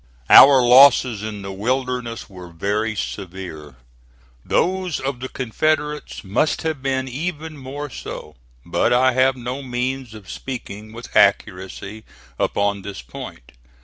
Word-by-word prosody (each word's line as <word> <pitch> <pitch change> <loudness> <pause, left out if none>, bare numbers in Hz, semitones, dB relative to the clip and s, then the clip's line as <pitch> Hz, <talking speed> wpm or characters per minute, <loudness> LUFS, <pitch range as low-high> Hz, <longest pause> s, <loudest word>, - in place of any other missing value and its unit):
Our 135 -2 +9
losses 125 -3 +6
in 105 -2 -6
the 95 - -6
Wilderness 125 +2 -2
were 90 -4 -11
very 105 +6 -2
severe. 90 -8 -6 0.7
Those 185 -2 0
of 135 -2 -3
the 130 +1 -6
Confederates 150 +4 -2
must 105 +10 0
have 160 -4 -2
been 130 -1 -1
even 155 +3 -5
more 140 +1 -6
so; 75 -9 -8 0.3
but - - +1
I 130 +1 +4
have 130 +1 +3
no 125 +2 -5
means 125 -1 -3
of 105 -3 -12
speaking 110 -4 -7
with 115 +2 -11
accuracy 100 +3 +1 0.4
upon 100 0 0
this 100 -8 -8
point. - - -10
125 Hz, 130 wpm, -21 LUFS, 100-135 Hz, 0.7 s, Our